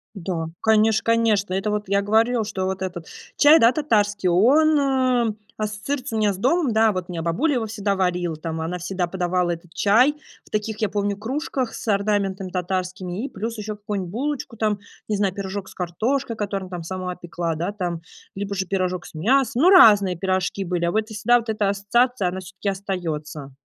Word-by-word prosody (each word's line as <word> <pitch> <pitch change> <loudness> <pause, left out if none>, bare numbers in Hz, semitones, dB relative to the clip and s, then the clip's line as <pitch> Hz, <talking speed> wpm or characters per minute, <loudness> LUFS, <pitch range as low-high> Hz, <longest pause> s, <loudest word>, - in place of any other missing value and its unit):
Да, 170 -4 -3
конечно, 220 0 +3
конечно. 220 -4 +2
Это 195 +3 -1
вот 210 -1 -2
я 200 +1 +2
говорила, 225 +3 +2
что 195 -3 -3
вот 190 0 -3
этот 175 -3 -5 0.3
чай, 300 +2 +7
да, 230 -2 +5
татарский, 205 -9 +1
он, 285 - +4
эм, 255 -5 +1 0.2
ассоциируется 220 +4 -3
у - - 0
меня 210 -2 +2
с - - -6
домом. 270 - +1
Да, 220 0 +4
вот 185 -1 -4
меня 170 -2 -4
бабуля 230 - +1
его 235 -3 -1
всегда 205 -2 -2
варил. 180 -3 0
Там 160 +1 -5
она 165 +3 -3
всегда 180 +1 -2
подавала 180 0 -1
этот 170 0 -9
чай 220 +10 +4 0.3
в - - -22
таких, 215 0 -2
я 215 - +1
помню, 205 0 -1
кружках 260 +2 -3
с - - -7
орнаментами 200 -2 0
татарскими 185 +2 -3
и - - -3
плюс 225 +3 -5
ещё 215 0 -5
какую-нибудь 205 -3 -4
булочку 265 0 -3
там, 215 -2 0 0.3
не 215 - 0
знаю, 200 -2 +1
пирожок 195 0 -5
с - - -14
картошкой, 230 +8 -2
которым 200 -3 -3
там 180 -2 -6
сама 180 +1 -5
пекла, 170 -1 -3
да, 170 +5 -3
там, 175 -5 -4 0.3
либо 200 0 -4
же 190 -1 -2
пирожок 185 -1 -2
с - - -14
мясом, 255 - +2
но 360 - +7
разные 205 - +7
пирожки 190 +2 -1
были. 175 -1 -1
А 170 - +2
вот 220 +1 -1
и - - -7
всегда 240 +3 +4
вот 235 -1 -8
эта 210 -2 +1
ассоциация, 200 +2 +1
она 185 +1 -4
всё-таки 195 +2 -6
остаётся. 165 -7 -4
200 Hz, 195 wpm, -23 LUFS, 180-225 Hz, 0.3 s, чай